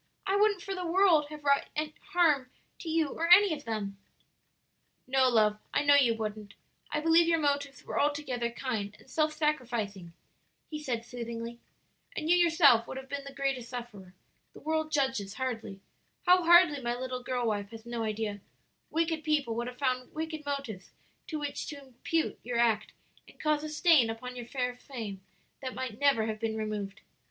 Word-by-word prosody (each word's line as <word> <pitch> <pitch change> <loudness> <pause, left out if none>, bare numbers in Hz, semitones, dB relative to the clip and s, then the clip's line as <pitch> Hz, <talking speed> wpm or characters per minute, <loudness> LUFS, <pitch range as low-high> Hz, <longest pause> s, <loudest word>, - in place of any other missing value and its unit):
"I 390 0 +1
wouldn't 410 -2 +3
for 390 -1 -4
the 365 -1 -4
world 345 -3 +4
have 300 -1 -9
wrought 280 -1 +3 0.5
harm 300 -7 +3 0.3
to 335 - -6
you 320 -2 +1
or 335 +4 -2
any 380 0 +8
of 290 -1 -7
them." 205 -3 -4 1.1
"No, 260 0 +3
love, 215 -3 +3 0.2
I - - +3
know 285 0 +6
you 260 -5 +5
wouldn't. 215 -2 -5 0.4
I 300 - 0
believe 330 +2 +4
your 335 -1 +4
motives 285 -3 -1
were - - -2
altogether 280 -5 0
kind 220 -4 -4
and - - -20
self 305 +3 +1
sacrificing," 235 - -2 0.6
he 305 0 -4
said 235 -5 -3
soothingly; 235 -1 -6 0.6
"and 310 - -3
you - - +7
yourself 320 -9 +5
would - - -6
have 265 0 -8
been 280 0 -4
the 275 - -7
greatest 270 -3 -2
sufferer; 210 -7 -8 0.4
the - - -12
world 315 +1 -1
judges 265 -9 0
hardly 225 -7 -4 0.4
how 360 0 +6
hardly 340 -4 +6
my 240 -1 -1
little 255 0 -4
girl 245 -1 -2
wife 205 -2 -1
has 225 0 -11
no 235 -1 -4
idea; 215 -1 -2 0.5
wicked 325 -1 0
people 295 -6 +1
would 235 +1 -3
have 250 0 -8
found 255 -2 -1
wicked 315 -1 -4
motives 275 -9 -4 0.4
to 315 - -3
which 290 -1 -4
to 290 - -6
impute 275 +5 -2
your 240 0 -3
act 225 -3 +2 0.4
and - - -18
caused 305 -1 +1
a 310 - -4
stain 305 -6 +4
upon 250 +3 -6
your 240 -2 -7
fair 250 -1 -2
fame 225 -7 -7 0.4
that 260 -2 -5
might 255 -4 -5
never 275 -6 +3
have 215 -1 -3
been 220 0 -2
removed. 210 -2 -4
260 Hz, 180 wpm, -30 LUFS, 230-305 Hz, 1.1 s, any